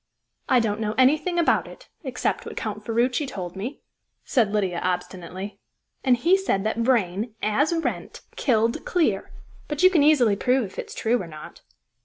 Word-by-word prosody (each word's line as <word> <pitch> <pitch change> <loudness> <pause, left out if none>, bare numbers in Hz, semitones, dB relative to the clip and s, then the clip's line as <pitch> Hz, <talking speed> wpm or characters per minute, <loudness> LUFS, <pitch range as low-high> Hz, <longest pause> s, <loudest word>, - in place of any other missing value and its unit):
"I 255 - +5
don't 215 -2 -1
know 215 -1 -2
anything 300 +7 +3
about 340 - +2
it, - - -13 0.2
except 255 -3 -2
what - - -8
Count 215 -1 -4
Ferruci 245 +5 0
told 180 -7 -6
me," 230 +9 -6 0.4
said 230 -7 +2
Lydia 190 -5 0
obstinately. 185 +2 -4 0.4
"And 255 -2 +4
he 335 +10 +4
said 360 - 0
that 220 +1 -1
Vrain, 225 -3 +1
as 270 +10 +2
Wrent, 330 -1 -3
killed 230 -3 +1
Clear. 350 -3 0 0.4
But 295 +3 -2
you 370 - +8
can 335 -5 +4
easily 275 -8 +5
prove 250 +5 +2
if 190 - -9
it's - - -6
true 230 +1 +1
or 175 - -7
not." 155 -1 -11
230 Hz, 170 wpm, -24 LUFS, 200-280 Hz, 0.4 s, you